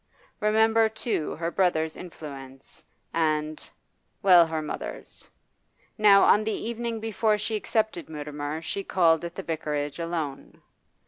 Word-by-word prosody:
Remember, 220 +1 +3
too, 220 -7 -2
her 165 +1 -3
brother's 160 -4 +1
influence, 135 -6 -10 0.3
and 155 -1 -1 0.5
well, 180 -4 +7
her 160 -1 -2
mother's. 155 - -7 0.7
Now, 205 -2 +6
on 210 - +5
the 220 - -1 0.2
evening 235 -1 -3
before 220 0 +1
she 215 +1 -2
accepted 215 -5 -1
Mutimer 150 +1 -5
she 200 +4 -3
called 165 -4 +3
at 170 0 -6
the 195 - -5
Vicarage 150 -2 -3
alone. 165 -5 -4
170 Hz, 125 wpm, -26 LUFS, 155-215 Hz, 0.7 s, well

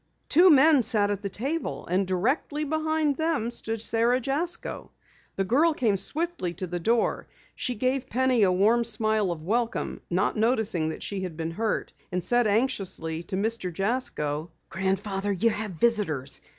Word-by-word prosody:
Two 350 +5 +7
men 295 -1 +6
sat 210 -3 +2
at 200 -1 -3
the 200 - -3
table, 275 - -3
and 185 +2 0
directly 260 - -1
behind 315 -1 0
them 315 -8 0
stood 225 -2 -2
Sara 235 +2 +2
Jasko. 285 +7 -2 0.5
The 195 - 0
girl 295 - +3
came 220 -7 +1
swiftly 290 - -2
to 185 - -4
the 175 0 -4
door. 230 +7 0 0.3
She 250 - -3
gave 255 +3 -1
Penny 255 -1 +2
a 190 -3 +4
warm 215 +6 +3
smile 215 -3 +2
of 160 -2 -6
welcome, 230 +6 -1
not 185 +4 0
noticing 220 -8 +1
that 160 - -6
she 200 -2 -3
had 180 -4 -5
been 165 0 -3
hurt, 220 +6 -2 0.2
and 180 -1 -2
said 240 +4 +2
anxiously 195 -8 -1
to 180 - -5
Mr. 210 -2 -2
Jasko: 170 - -2 0.2
"Grandfather, 195 +1 -1
you 225 +5 +2
have 210 -2 -4
visitors. 160 - 0
220 Hz, 165 wpm, -26 LUFS, 185-255 Hz, 0.5 s, Two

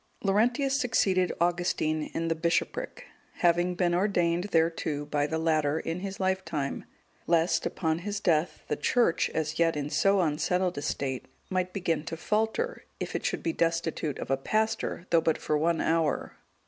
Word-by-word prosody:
Laurentius(182) 235 +8 +2
succeeded 215 -9 +2
Augustine 170 -3 0
in 165 0 -1
the 165 - +2
bishopric, 175 - -1 0.3
having 175 +1 +2
been 175 -1 +1
ordained 175 -2 +1
thereto 160 -3 0
by 145 0 0
the 160 - -2
latter, 155 -2 +1
in 165 +2 -3
his 195 +1 -6
lifetime, 185 -7 -1 0.4
lest, 170 0 +2
upon 160 -2 -1
his 205 +3 -3
death, 170 -3 +1
the - - 0
Church, 235 -9 +2
as 160 0 -2
yet 165 -2 +3
in 145 0 -3
so 195 0 +3
unsettled 180 +3 0
a - - -6
state, 130 -3 -3 0.2
might 185 -1 0
begin 165 -5 -1
to 165 - -5
falter, 220 - -1 0.2
if - - -4
it - - -2
should - - -2
be 330 - 0
destitute 165 - -1
of - - -5
a 135 - +3
pastor, 220 +3 -1
though 165 -1 +5
but 160 -1 +1
for 155 - -1
one 165 +2 +1
hour. 165 -2 0
170 Hz, 165 wpm, -28 LUFS, 160-190 Hz, 0.4 s, though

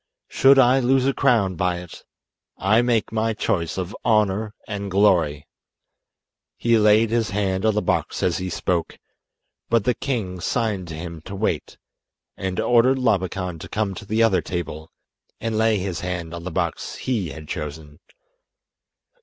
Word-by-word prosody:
Should 135 +1 +5
I 130 0 +5
lose 130 +1 +2
a 135 - +2
crown 115 -10 +2
by 90 +1 0
it 90 -2 -10 0.5
I 110 +5 +3
make 120 -3 +1
my 110 0 0
choice 85 -5 -1
of 95 +1 -4
'Honour 105 0 +1
and 100 -2 -4
Glory.'" 90 -7 +2 1.1
He 115 -1 +3
laid 105 +1 +4
his 115 -3 +1
hand 95 +1 0
on 110 - +2
the 105 - 0
box - - -1
as 90 0 +1
he 95 0 -3
spoke, 85 -1 -2 0.7
but 115 -2 +3
the 125 - +2
king 110 -10 -3
signed 105 -3 -1
to 80 - -6
him 80 0 -7
to 100 - -7
wait, 95 -6 -2 0.6
and 95 -1 -3
ordered 120 +2 +4
Labakan 95 -7 -1
to - - -9
come 105 -2 -1
to 105 - -9
the 110 +3 +1
other 105 -5 +3
table 80 -3 -5 0.5
and 115 -1 -2
lay 110 0 +3
his 95 -3 -3
hand 90 -2 -4
on 85 0 -7
the - - -2
box - - -2
he 110 -10 -2
had 75 +2 -9
chosen. 75 0 -6
100 Hz, 160 wpm, -23 LUFS, 90-115 Hz, 1.1 s, Should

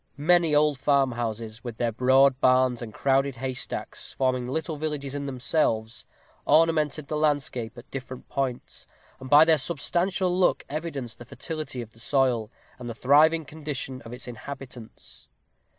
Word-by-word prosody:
Many 165 +1 +3
old 150 -2 +3
farmhouses, 120 -5 0
with 120 -3 -6
their 120 -1 0
broad 130 +3 +4
barns 130 -1 +3
and 115 -2 -6
crowded 135 +3 +1
haystacks 130 +1 -5
forming 130 -2 0
little 160 +4 -3
villages 145 -2 -4
in 140 0 -4
themselves 125 -4 -1 0.4
ornamented 155 -2 +2
the 155 - -3
landscape 140 -6 -1
at 120 - -13
different 130 -1 -7
points, 130 -3 -4 0.3
and 130 0 -9
by 150 +3 +8
their 160 -2 +4
substantial 175 +4 0
look 185 0 +2
evidenced 145 -7 -5
the 120 - -10
fertility 150 -2 -6
of 115 - -14
the 115 - -19
soil, 125 -3 +1 0.3
and 120 -1 -6
the 115 - -6
thriving 155 +6 +4
condition 140 -3 -5
of 115 - -11
its 125 0 -9
inhabitants. 125 0 -10
135 Hz, 150 wpm, -26 LUFS, 125-150 Hz, 0.4 s, by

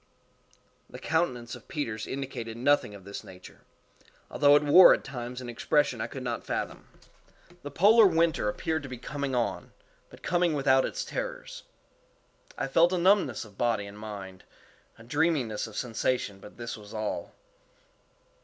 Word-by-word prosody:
The - - -9
countenance 125 -8 -1
of - - -11
Peters 120 -11 -4
indicated 130 -4 -5
nothing 130 -4 +2
of 100 - -13
this 100 +1 -8
nature, 90 -1 -14 0.7
although 145 0 +5
it 145 - +4
wore 175 +5 +8
at - - -9
times 125 -1 -6
an 125 - -8
expression 125 0 0
I - - -2
could 130 - -8
not 120 -2 -3
fathom. - - -4 0.7
The 145 - -7
polar 205 - +6
winter 165 - +1
appeared 160 +8 -2
to 140 - -9
be 125 - -6
coming 135 +2 -4
on—but 120 -1 -6
coming 175 -3 +1
without 135 -2 +3
its - - -4
terrors. - - -6 0.9
I - - -2
felt 170 +6 +4
a - - +1
numbness 180 - +2
of 100 -2 -18
body 115 -4 +1
and 100 +1 -11
mind—a 100 +1 -12
dreaminess 135 -5 0
of 110 - -10
sensation 115 -4 -2
but 105 - -14
this 120 -1 -5
was 105 0 -12
all. 110 -1 -4
125 Hz, 155 wpm, -28 LUFS, 110-150 Hz, 0.9 s, wore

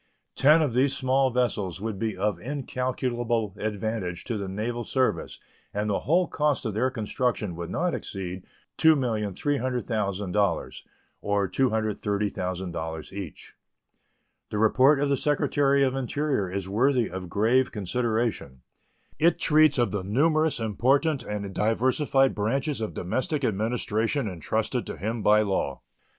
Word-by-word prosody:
Ten 155 +4 +5
of 140 -6 -1
these 135 +2 +2
small 130 0 +2
vessels 110 -8 -1
would 105 -1 -4
be 110 -3 -2
of 100 -2 0
incalculable 120 -3 -2
advantage 105 -4 -3
to 115 - -3
the 100 -2 -3
naval 115 +5 -3
service, 130 +2 -1 0.4
and 105 +1 -1
the - - +1
whole 175 +4 +2
cost 150 -4 0
of 110 - -2
their 125 +5 +1
construction 110 -4 -2
would 85 0 -6
not 180 0 0
exceed 90 -2 -5 0.4
$2,300,000, 110 - 0 0.4
or 100 -1 0
$230,000 95 - -2
each. 95 -5 -8 1.0
The 105 - -3
report 130 +7 +4
of 145 - +1
the 140 - +3
Secretary 140 -1 +2
of 130 -1 +2
the 135 - -2
Interior 135 -6 -1
is 95 -1 -3
worthy 120 +3 +2
of 90 0 -7
grave 115 +7 +2
consideration. 110 - -2 0.6
It 165 +1 +4
treats 155 -2 +4
of 120 -1 +2
the 105 - -2
numerous 155 - +2
important 130 - +1
and 105 -4 -5
diversified 130 +5 +2
branches 130 +6 -1
of 110 - -4
domestic 140 - -2
administration 115 +3 0
intrusted 90 -5 -2
to - - -6
him 110 +3 -3
by 105 +1 +5
law. 95 -9 -2
115 Hz, 135 wpm, -26 LUFS, 100-135 Hz, 1.0 s, Ten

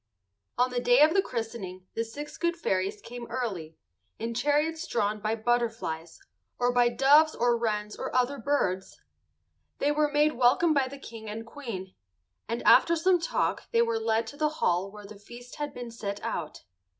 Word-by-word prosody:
On 250 +1 +2
the 245 - 0
day 245 +1 +4
of 310 +2 +6
the 390 - +4
christening 220 - -5
the 230 - -1
six 290 +6 -8
good 340 0 0
fairies 195 - -1
came 240 0 -8
early, 185 -11 -4 0.4
in 230 +1 -3
chariots 300 +5 0
drawn 210 -2 0
by 215 +1 -1
butterflies, 225 -8 -2 0.4
or 245 0 +1
by 245 -1 +4
doves 290 +6 +5
or 240 0 +2
wrens 210 -2 -2
or - - -4
other 255 +2 +1
birds. 190 -10 -1 0.8
They 290 - +1
were 295 0 +1
made 295 +1 +3
welcome 255 +7 +4
by 275 -3 +2
the 280 +2 -9
King 225 -5 -9
and 225 +2 -6
Queen, 230 -8 -7 0.6
and 230 +1 -2
after 335 - +6
some 355 +2 +3
talk 335 - -1
they 230 - +4
were 230 -1 0
led 225 0 +1
to 255 +6 -10
the 305 0 +2
hall 180 +3 +1
where 210 0 -11
the 200 0 -12
feast 240 +4 -12
had 295 -1 -3
been 240 -1 -7
set 205 -3 -5
out. 155 -3 -4
235 Hz, 180 wpm, -28 LUFS, 210-285 Hz, 0.8 s, of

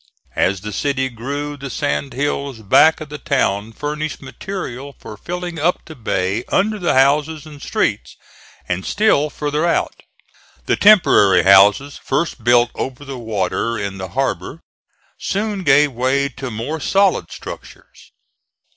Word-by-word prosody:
As 95 0 +1
the 105 0 -6
city 130 +3 -1
grew, 140 +5 -5
the 135 -1 -7
sand 140 -1 -2
hills 140 -3 -3
back 155 +11 +4
of 155 - -7
the 150 0 -7
town 110 -8 0
furnished 150 +5 -4
material 135 -1 -7
for 105 - -10
filling 175 - -6
up 170 +4 0
the 160 - -10
bay 100 -2 -1
under 215 +2 +1
the 175 -6 +1
houses 145 +3 +2
and 150 -2 -12
streets, - - -2 0.5
and 90 +1 -2
still 175 - +2
further 150 +1 -2
out. 170 - +1 0.7
The - - +2
temporary 105 - +5
houses, 100 +9 +5
first 135 -3 -2
built 120 0 +4
over 135 +2 -5
the 135 -2 -7
water 110 +1 -2
in 100 -2 -4
the 95 0 -6
harbor, 135 - -2 0.6
soon 205 0 -2
gave 145 -1 +4
way 130 +3 0
to 135 0 -7
more 120 +8 -4
solid 190 - +1
structures. - - -11
140 Hz, 145 wpm, -19 LUFS, 115-155 Hz, 0.7 s, temporary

